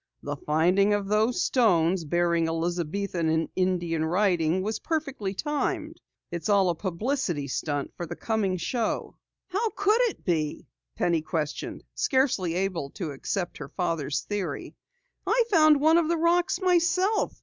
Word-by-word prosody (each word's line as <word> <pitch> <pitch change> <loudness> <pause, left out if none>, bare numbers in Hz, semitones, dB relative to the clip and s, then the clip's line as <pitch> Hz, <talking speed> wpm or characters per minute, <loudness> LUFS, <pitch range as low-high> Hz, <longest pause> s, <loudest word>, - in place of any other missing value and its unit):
"The 145 0 -3
finding 180 +8 +2
of 205 -1 -3
those 215 +4 +2
stones 180 -8 +2
bearing 170 +1 +1
Elizabethan 170 +1 -1
and 160 0 +1
Indian 175 -3 0
writing 175 0 +1
was 215 +1 -2
perfectly 275 -11 -3
timed! 310 - -2 0.3
It's 170 +4 -4
all 195 -3 +4
a - - -4
publicity 185 - -2
stunt 145 +1 -3
for 175 - -5
the - - -6
coming 210 -5 -1
show!" 230 +6 -2 0.3
"How 415 +5 0
could 420 +4 +3
it - - -12
be?" 155 -4 -1 0.3
Penny 170 -2 +1
questioned, 155 -1 -4
scarcely 260 - +1
able 180 -6 -1
to 165 -6 -4
accept 175 +6 -3
her - - -7
father's 150 -6 -1
theory. 205 -3 -4 0.5
"I 465 +5 +4
found 310 -5 +6
one 320 +3 +5
of 330 - 0
the 340 +1 +1
rocks 345 +2 +2
myself. 365 +3 +2
190 Hz, 145 wpm, -27 LUFS, -, 0.5 s, found